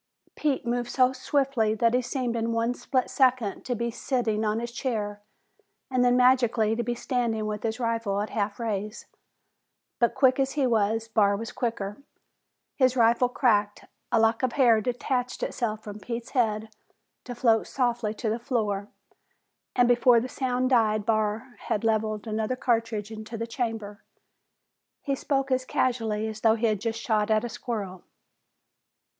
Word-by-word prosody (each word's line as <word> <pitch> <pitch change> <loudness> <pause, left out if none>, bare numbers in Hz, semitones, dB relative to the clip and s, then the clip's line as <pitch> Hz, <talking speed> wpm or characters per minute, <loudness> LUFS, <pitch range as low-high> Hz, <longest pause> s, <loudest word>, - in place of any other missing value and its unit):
Pete 280 -5 -1
moved 240 0 -1
so 255 -1 +3
swiftly 260 -5 0
that 230 +1 +2
he 250 - +3
seemed 245 -1 -2
in 230 0 -1
one 230 +1 +1
split 255 +1 -1
second 255 -6 +1
to 245 - -1
be 235 +1 -2
sitting 225 -3 -1
on 215 +1 0
his 235 0 -5
chair 215 -5 -3 0.7
and 255 -1 +2
then, 245 0 +4
magically, 240 -4 +3
to 240 - -1
be 240 +1 -2
standing 235 -3 -1
with 210 0 -3
his 225 +1 -2
rifle 230 -4 -1
at 210 - -3
half 205 0 -2
raise. 215 -1 -3 0.9
But 235 - +2
quick 260 -1 +4
as 270 0 +1
he 285 -2 +1
was, 225 -1 +1
Barr 205 -3 +2
was 225 +1 -6
quicker. 215 -1 -3 0.8
His 260 -2 +3
rifle 235 +1 +4
cracked, 210 -5 +1 0.3
a 235 - +4
lock 225 0 +3
of 255 -2 0
hair 235 -5 +4
detached 250 +2 -2
itself 220 -3 -2
from 210 0 -8
Pete's 235 +2 -6
head 220 -4 0 0.5
to 245 - -6
float 230 -2 +2
softly 240 -4 -1
to 220 0 -2
the 225 - -2
floor, 210 -5 -1 0.9
and 245 -1 +4
before 245 0 +5
the 245 - -3
sound 255 0 -1
died 215 -4 +3
Barr 220 +3 -1
had 210 - -1
levered 215 -1 0
another 220 +2 -1
cartridge 225 -4 -1
into 220 +1 -7
the 230 - -3
chamber. 225 -4 -4 1.0
He 280 - -1
spoke 275 0 -1
as 255 0 +2
casually 225 -4 0
as 215 0 -7
though 220 -1 +4
he 230 +1 -1
had 215 -3 +1
just 225 0 -2
shot 215 -2 0
at 215 +1 +3
a - - -4
squirrel. 215 -6 -5
230 Hz, 165 wpm, -26 LUFS, 215-250 Hz, 1.0 s, before